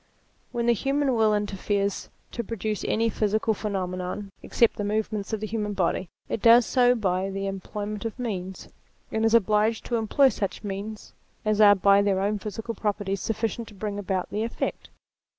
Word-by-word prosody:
When 235 -1 -1
the 240 - +5
human 275 +3 0
will 220 -2 +3
interferes 200 -1 -1 0.2
to 235 - -3
produce 215 -1 -3
any 230 +1 +1
physical 215 +1 +1
phenomenon, 190 -1 -4
except 235 - +2
the 205 - -2
movements 210 0 -2
of 220 -1 -2
the - - -1
human 210 -1 -2
body, 185 -1 0 0.2
it 220 - -3
does 235 +1 +7
so 250 0 +4
by 190 -3 0
the 195 0 -3
employment 205 +2 -5
of 225 0 -4
means: 190 -6 -5 0.4
and 220 - 0
is 225 +1 +4
obliged 215 +1 +2
to 240 - 0
employ 245 +5 +4
such 200 -3 -4
means 205 +2 -6 0.3
as 215 0 +2
are 205 -1 +8
by 200 +1 +5
their 200 -2 +1
own 205 +2 0
physical 215 +3 -5
properties 205 -2 -2
sufficient 225 +1 -2
to 210 - -13
bring 205 +1 -4
about 190 -2 -2
the 210 - -2
effect. 230 +1 -3
210 Hz, 175 wpm, -26 LUFS, 195-225 Hz, 0.4 s, are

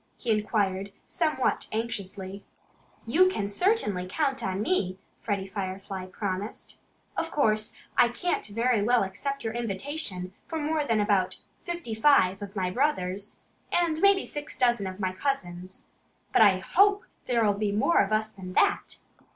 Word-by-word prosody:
he 240 - -2
inquired 200 -2 0
somewhat 305 -7 0
anxiously. 200 -3 -4 0.6
"You 350 +11 +5 0.2
certainly 205 - 0
can - - -13
count 275 -3 +1
on 190 +2 -1
me," 185 - 0 0.2
Freddie 200 -3 -2
Firefly 190 -1 -5
promised. 195 +2 -5 0.4
"Of - - -1
course, 215 -6 +1 0.2
I - - +7
can't 350 +9 -1
very 230 +1 +1
well 240 +1 +3
accept 275 +9 -4
your 225 -1 -2
invitation 220 -4 -3
for 325 - -3
more 305 0 0
than 225 -5 +2
about 205 -3 +2 0.3
fifty 345 -9 -4
five 220 -6 +4
of 200 0 -7
my 185 -2 -1
brothers 205 -6 -1 0.3
and 335 -2 +1
maybe 395 -1 +5
six 295 0 -6
dozen 240 -6 +2
of 185 +1 -7
my 185 -2 -1
cousins. 185 -7 -4 0.4
But - - +5
I 200 -4 +7
HOPE 400 - +3 0.2
there'll 230 -4 +3
be 205 0 -1
more 215 +11 +3
of 195 - -1
us 215 0 +1
than 185 -3 -9
that." 400 - +2
215 Hz, 150 wpm, -27 LUFS, 190-275 Hz, 0.6 s, I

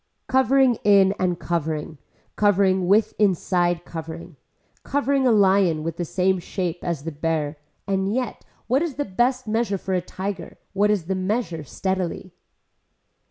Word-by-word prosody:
Covering 265 -2 +3
in 200 -2 +5
and 180 -2 0
covering, 160 -2 -3 0.4
covering 190 -3 +3
with 210 +3 +3
inside 175 -3 +1
covering. 165 0 -8 0.5
Covering 275 -1 +1
a - - +5
lion 190 -6 +3
with 165 0 -4
the 175 - -2
same 185 +2 +1
shape 175 -1 -3
as 170 -5 -3
the 165 - -4
bear 155 -1 -2 0.3
and 195 0 0
yet 250 0 -3 0.2
what 260 +4 +2
is 330 -6 -2
the 290 - -2
best 245 +5 0
measure 220 -2 0
for 190 0 -4
a 180 - +1
tiger, 190 +1 -6 0.2
what 205 +2 +2
is 205 -6 +1
the 190 - -1
measure 185 -3 -2
steadily. 185 +3 -3
190 Hz, 150 wpm, -23 LUFS, 170-210 Hz, 0.5 s, in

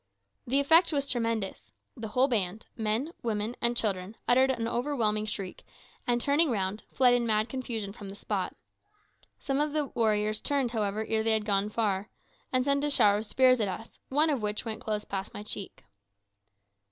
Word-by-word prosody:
The 270 +4 +3
effect 325 +5 +5
was 280 -2 0
tremendous. 225 - -2 0.2
The 225 - -6
whole 250 +5 +3
band 210 -4 -1
men, 225 +7 -1
women, 220 0 -2
and 235 0 +1
children 200 -1 -1
uttered 260 +2 +5
an 230 -3 0
overwhelming 230 -4 0
shriek, 195 -3 -5 0.4
and 240 -1 +2
turning 290 +5 +3
round, 205 -2 -1
fled 250 -2 +4
in 240 -1 +1
mad 215 +1 +1
confusion 230 -6 -4
from 205 -2 -9
the 195 - -8
spot. - - -3 0.8
Some 275 -1 -2
of 300 -1 -1
the 305 -1 +1
warriors 215 -1 +1
turned, 275 -4 +1
however, 215 -1 -1
ere 220 -1 +1
they 225 0 +3
had 215 -1 +2
gone 200 -1 +1
far, 210 -2 -1 0.4
and 255 0 +2
sent 280 0 +2
a 295 - +1
shower 205 -7 +4
of 220 - -6
spears 255 +2 +4
at 210 - +1
us, 220 +4 -7
one 305 +4 +3
of 270 -5 -1
which 210 +2 -3
went 220 -1 -4
close 210 -1 -2
past 195 +1 -5
my 205 - -6
cheek. 205 -2 -6
225 Hz, 185 wpm, -29 LUFS, 210-260 Hz, 0.8 s, effect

